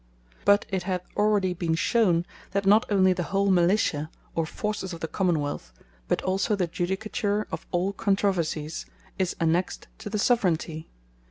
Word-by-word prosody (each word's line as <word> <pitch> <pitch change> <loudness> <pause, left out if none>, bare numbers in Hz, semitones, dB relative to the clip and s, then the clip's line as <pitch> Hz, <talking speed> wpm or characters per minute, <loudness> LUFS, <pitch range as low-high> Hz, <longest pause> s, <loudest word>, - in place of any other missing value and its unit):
But 200 0 +5
it 190 -2 -1
hath 180 0 -2
already 205 -3 +2
been 170 -2 -1
shown, 175 -3 +2 0.3
that 200 0 0
not 210 +5 +5
onely 190 -2 +4
the 180 - -3
whole 195 0 +2
Militia, 175 -4 +2 0.2
or 165 -1 -1
forces 210 -1 -3
of 170 - -7
the 160 - -3
Common 175 -1 +1
wealth; 145 - -4 0.4
but - - 0
also 190 +3 +1
the 190 -3 +1
Judicature 205 +4 -1
of - - -6
all 185 +3 0
Controversies, 180 -6 -1 0.3
is 185 -2 0
annexed 170 +2 0
to - - -6
the 210 - -2
Soveraignty. 175 -8 +1
185 Hz, 160 wpm, -26 LUFS, 170-200 Hz, 0.4 s, But